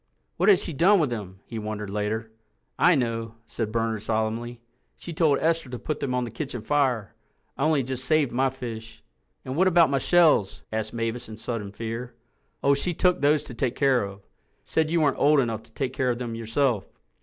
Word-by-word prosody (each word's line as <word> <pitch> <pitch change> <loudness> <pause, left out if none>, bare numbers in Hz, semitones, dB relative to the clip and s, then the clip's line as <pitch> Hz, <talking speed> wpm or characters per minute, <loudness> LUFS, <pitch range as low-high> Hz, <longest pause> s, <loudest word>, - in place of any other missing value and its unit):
"What - - +3
has 405 - +5
she 170 - -4
done 185 +8 +5
with 150 -6 +1
them?" 95 -4 -6
he 115 - -6
wondered 105 -1 -5
later. 105 +2 -2 0.5
"I 175 -1 +6
know," 115 -3 -2
said 110 -1 -4
Bernard 115 -1 -1
solemnly. 110 +2 -2 0.4
"She 170 - -8
told 155 -3 +3
Esther 165 -3 0
to 125 - -5
put 150 +6 -4
them 125 -2 -2
on 125 - 0
the 120 - -5
kitchen 130 -7 -5
fire—I 130 -2 -2
only 155 -3 +3
just 130 0 -4
saved 155 -4 +2
my 130 +2 +2
fish." 115 -4 -8 0.4
"And 130 0 -4
what 185 +4 +4
about 170 -4 +5
my 135 - +2
shells?" 155 - +3
asked 110 0 -2
Mavis 115 0 -3
in 110 - -8
sudden 110 -3 -4
fear. 115 +3 -6 0.5
"Oh, 140 - +5
she 170 +5 -1
took 180 +1 +2
those 145 +1 +3
to - - -9
take 120 +1 -1
care 135 -4 +3
of. 100 0 -8 0.4
Said 160 -1 0
you 165 0 +2
weren't 145 - +2
old 150 0 +5
enough 115 -4 -1
to 110 - -19
take 130 -2 -2
care 130 -1 0
of 120 - 0
them 120 -2 -4
yourself." 115 0 0
125 Hz, 200 wpm, -25 LUFS, 110-145 Hz, 0.5 s, I